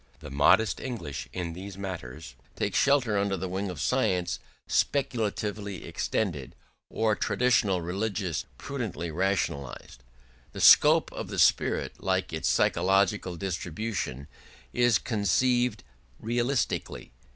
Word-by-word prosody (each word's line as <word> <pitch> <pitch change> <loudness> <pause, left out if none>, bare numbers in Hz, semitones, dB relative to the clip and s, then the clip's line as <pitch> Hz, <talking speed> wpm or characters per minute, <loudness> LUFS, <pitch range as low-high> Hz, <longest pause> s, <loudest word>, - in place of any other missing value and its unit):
The 75 -3 -10
modest 85 +10 +3
English 80 - -6
in 85 +1 -4
these 95 +2 -8
matters 80 -9 -7 0.2
take - - -2
shelter 130 -7 +3
under 100 -1 0
the 95 +2 -4
wing 95 +2 -3
of 90 - -6
science 90 -1 0 0.3
speculatively 105 -6 -1
extended, 85 - -2 0.3
or 110 -1 +1
traditional 105 -4 +2
religion 95 +1 -2 0.2
prudently 110 - -4
rationalised: 75 -8 -2 0.5
the - - -7
scope - - +7
of - - -6
the - - -6
spirit, - - +2
like 95 -2 0
its 80 - -1
psychological 95 +1 +2
distribution, 85 - -4 0.5
is 120 -2 +4
conceived 120 +2 +1 0.4
realistically. 120 - -2
95 Hz, 110 wpm, -28 LUFS, 85-110 Hz, 0.5 s, scope